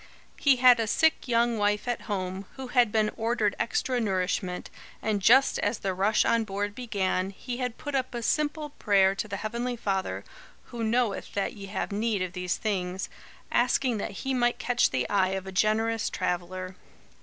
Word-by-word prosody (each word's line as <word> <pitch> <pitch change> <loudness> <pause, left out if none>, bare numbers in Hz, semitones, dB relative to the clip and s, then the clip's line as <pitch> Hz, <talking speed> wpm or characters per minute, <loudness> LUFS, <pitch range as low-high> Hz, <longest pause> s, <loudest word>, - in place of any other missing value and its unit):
He 280 -2 +5
had 250 -1 +6
a 225 - 0
sick 320 +8 +2
young 235 -1 +2
wife 205 +2 +1
at 240 -1 -3
home, 190 -1 -3
who 265 -2 -7
had 245 -4 +3
been 215 -1 +2
ordered 225 -3 0
extra 250 +1 0
nourishment, 185 -2 -1 0.3
and 210 -2 -1
just 260 +7 +5
as 235 - 0
the 190 -1 -2
rush 200 +4 +2
on 230 -1 +3
board 205 0 -3
began, 195 -5 -1
he 240 +5 -6
had 250 -2 -3
put 290 -1 -6
up 260 -2 -1
a 235 - -3
simple 300 +3 0
prayer 195 -6 +3
to 200 - -4
the 200 -1 -4
Heavenly 235 +4 -3
Father 195 -4 -2 0.4
"who 235 -2 -6
knoweth 225 -2 0
that 200 - -1
ye 200 -2 -9
have 205 - -3
need 210 -1 0
of 180 -1 -5
these 180 -1 -2
things," 190 -3 -2 0.4
asking 250 -1 +2
that 200 +4 -5
he 265 - 0
might 240 -1 +2
catch 245 0 +2
the 125 -2 -1
eye 190 -2 +2
of 190 - -6
a 190 - -6
generous 220 +3 +1
traveller. 185 +1 -3
215 Hz, 185 wpm, -27 LUFS, 195-240 Hz, 0.4 s, had